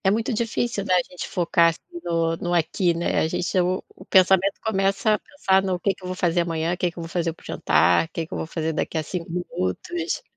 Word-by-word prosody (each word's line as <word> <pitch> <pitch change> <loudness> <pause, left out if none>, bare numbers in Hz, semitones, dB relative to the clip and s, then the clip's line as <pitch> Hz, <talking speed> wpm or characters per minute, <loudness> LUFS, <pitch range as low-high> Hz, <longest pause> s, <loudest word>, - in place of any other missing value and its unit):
É 190 - +4
muito 225 +4 0
difícil, 230 -1 -1
né, 185 -2 +2
a - - +6
gente 180 - -6
focar 170 -1 +3 0.3
no 165 -1 0
no 175 +1 -2
aqui, 170 +2 +2
né, 170 - 0
a - - +2
gente 175 +3 -2
é 185 - +5
o 185 +1 0
o - - -13
pensamento 190 +1 +4
começa 195 0 +2
a 210 - +1
pensar 195 -10 +1
no 190 -2 -1
que 195 +2 +1
que 185 - -20
eu - - -5
vou 185 - -3
fazer 175 -1 +1
amanhã, 165 0 -1
que 180 0 0
que 170 - -17
eu 170 - -5
vou 165 - -7
fazer 165 -1 -1
para - - -22
o - - -17
jantar, 90 - +3
que 165 0 -4
que - - -10
eu - - -3
vou - - -4
fazer 160 -1 -2
daqui 160 - -2
a 155 - 0
5 170 +2 -5
minutos. 180 - -3
180 Hz, 255 wpm, -24 LUFS, 165-195 Hz, 0.3 s, a